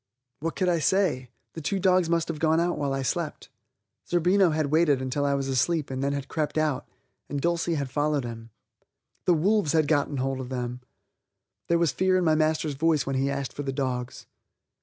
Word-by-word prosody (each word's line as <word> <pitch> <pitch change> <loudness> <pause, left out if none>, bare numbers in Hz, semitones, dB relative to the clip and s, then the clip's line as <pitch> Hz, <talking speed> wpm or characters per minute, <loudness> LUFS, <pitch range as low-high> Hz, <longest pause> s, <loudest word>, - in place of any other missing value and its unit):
What 165 +2 -3
could 185 - 0
I 175 -2 +2
say? 155 -6 +1 0.2
The 165 - -7
two 195 +6 -1
dogs 185 -2 +3
must 170 -1 +1
have 165 -2 -4
gone 160 +1 +3
out 175 +1 +1
while 140 -2 -2
I 135 0 -1
slept. 125 - -3 0.6
Zerbino 180 +2 +3
had 155 -2 -1
waited 155 -4 +3
until 130 +2 -1
I 140 0 +2
was 135 -1 -2
asleep 135 +3 0
and 130 +1 -3
had 140 - +1
then 140 - -1
crept 155 +2 -3
out, 155 -4 0 0.4
and 145 - -2
Dulcie 170 +2 0
had 140 -3 -3
followed 145 -2 0
him. 115 -1 -8 0.8
The 175 - +4
wolves 190 -1 +2
had 155 -2 +3
got 145 -2 +2
hold 135 0 -1
of 130 -1 -6
them! 125 -1 -4 0.9
There 170 - +3
was 170 -3 +2
fear 185 0 +2
in 185 - +1
my 160 - +4
master's 155 -1 +1
voice 155 -1 +1
when 135 - -2
he 135 +1 +1
asked 140 -1 -3
for - - -5
the 135 -1 -3
dogs. 130 -2 -3
150 Hz, 205 wpm, -26 LUFS, 135-170 Hz, 0.9 s, The